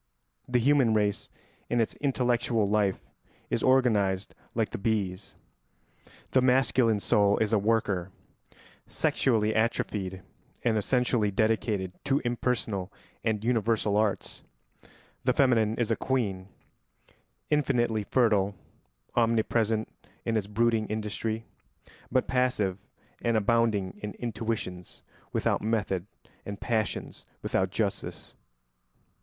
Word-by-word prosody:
The 125 - +2
human 130 -2 +4
race, 105 -1 0 0.4
in 120 - +1
its 115 - +1
intellectual 120 -5 +1
life, 100 -2 +1 0.5
is - - +1
organised 105 -7 +2 0.2
like 110 -2 0
the - - -4
bees: 100 -3 -2 1.0
the 130 - +4
masculine 125 -3 +3
soul 100 0 +3
is 110 0 0
a 110 - +4
worker, 100 -4 0 0.8
sexually 110 -4 +1
atrophied, 100 -4 -1 0.4
and 115 -2 +2
essentially 120 0 +1
dedicated 105 -2 0
to 135 +1 +2
impersonal 120 -6 -1 0.3
and 110 -2 0
universal 115 -3 +1
arts; 105 -1 0 0.8
the 125 - +3
feminine 115 -5 +3
is 115 -1 -1
a - - +3
queen, 100 -9 -1 1.0
infinitely 120 -7 +2
fertile, 100 -4 +2 0.6
omnipresent 115 -1 +2 0.4
in 115 - 0
its 105 -3 0
brooding 110 0 +1
industry, 110 +1 -3 0.7
but 130 - +2
passive 125 -7 +1 0.4
and 115 -1 +2
abounding 110 -3 +1
in 105 0 -5
intuitions 110 -6 -4 0.3
without - - 0
method 105 -4 -1 0.4
and 100 0 -6
passions 110 -3 -2 0.2
without 95 0 0
justice. 100 0 -3
110 Hz, 105 wpm, -28 LUFS, 100-120 Hz, 1.0 s, human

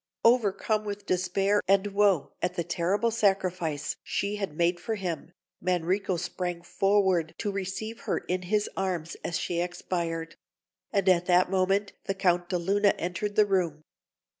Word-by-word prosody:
Overcome 215 -2 +3
with 205 -1 -5
despair 195 +3 +1
and 195 +1 +4
woe 200 -5 +2
at 180 0 -1
the 170 - -1
terrible 185 +7 0
sacrifice 185 -8 0
she 205 +1 -2
had 195 -7 -4
made 175 +1 +2
for 225 - -2
him, 175 -5 -4 0.3
Manrico 180 +1 0
sprang 175 -1 -4
forward 190 -4 +2
to 205 - -2
receive 200 +3 -4
her - - +2
in 180 0 -2
his 210 0 +2
arms 175 -4 -2
as 170 - -1
she 170 -1 -1
expired; 170 -2 -3 0.5
and 200 -2 +1
at 180 -1 +4
that 180 0 +4
moment 195 +1 +1
the 195 - -1
Count 175 -2 +1
de 180 - +1
Luna 200 +4 +2
entered 180 +4 -3
the 210 - +6
room. 175 -6 0
185 Hz, 155 wpm, -28 LUFS, 175-200 Hz, 0.5 s, the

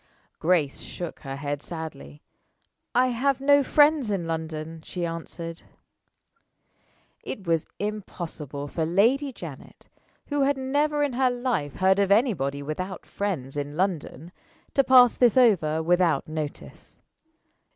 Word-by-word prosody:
Grace 160 -5 +1
shook 175 -2 -7
her 135 -1 -6
head 145 0 -4
sadly. 150 - -8 0.7
"I 255 +1 +4
have 260 +3 +1
no 285 +1 +5
friends 290 -2 +4
in 195 -4 -1
London," 160 0 -4
she 175 +1 -4
answered. 165 0 -6 1.6
It 200 -6 -6
was 165 -2 0
impossible 170 -9 -5
for 160 +3 -2
Lady 230 - +2
Janet 165 - -11 0.4
who 290 -1 0
had 275 0 +2
never 290 +3 +1
in 285 -3 -1
her 255 +1 +3
life 245 - -2
heard 190 +1 +3
of 200 -1 +2
anybody 170 - +2
without 185 +6 -5
friends 160 -10 -3
in 145 +1 -4
London 175 -3 -2 0.4
to 275 - +4
pass 250 -2 +6
this 245 -1 +4
over 160 -11 +4
without 175 0 +2
notice. 155 -2 -7
180 Hz, 130 wpm, -26 LUFS, 155-250 Hz, 1.6 s, pass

